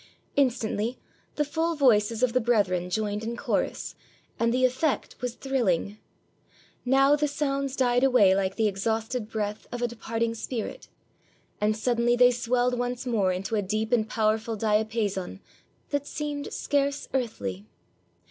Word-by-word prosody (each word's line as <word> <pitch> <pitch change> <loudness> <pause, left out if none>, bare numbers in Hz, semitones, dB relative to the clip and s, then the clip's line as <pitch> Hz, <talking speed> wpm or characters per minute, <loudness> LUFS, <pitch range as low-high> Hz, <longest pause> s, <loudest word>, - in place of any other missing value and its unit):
Instantly, 240 -3 0 0.4
the 295 - +1
full 325 +3 -1
voices 230 -4 +3
of 245 -2 +3
the 255 - +3
brethren 195 -6 +1
joined 210 +2 -1
in 235 +1 -4
chorus, - - -2 0.5
and 230 0 +2
the 255 +1 +3
effect 260 +4 0
was 250 -1 -3
thrilling; 215 -7 -1 0.8
now 270 +3 +5
the 295 0 +1
sounds 275 -2 -1
died 245 -1 +2
away 230 -8 +5
like 190 -1 0
the 220 -1 +2
exhausted 220 +3 -2
breath 210 -1 -3
of 245 - -4
a 240 - +1
depart 230 0 -3
ing 230 0 0
spirit, 230 0 -5 0.7
and 215 +1 +2
suddenly 240 +1 +2
they 245 0 +6
swelled 245 +1 0
once 245 +1 -2
more 210 -7 +1
into 190 +4 -4
a 210 - +2
deep 215 +3 -2
and 220 -3 +2
powerful 220 +1 0
diapason 210 -3 -1 0.5
that 285 0 -1
seemed 295 -1 -4
scarce 285 0 -1
earthly. 105 - -3
230 Hz, 150 wpm, -27 LUFS, 215-255 Hz, 0.8 s, they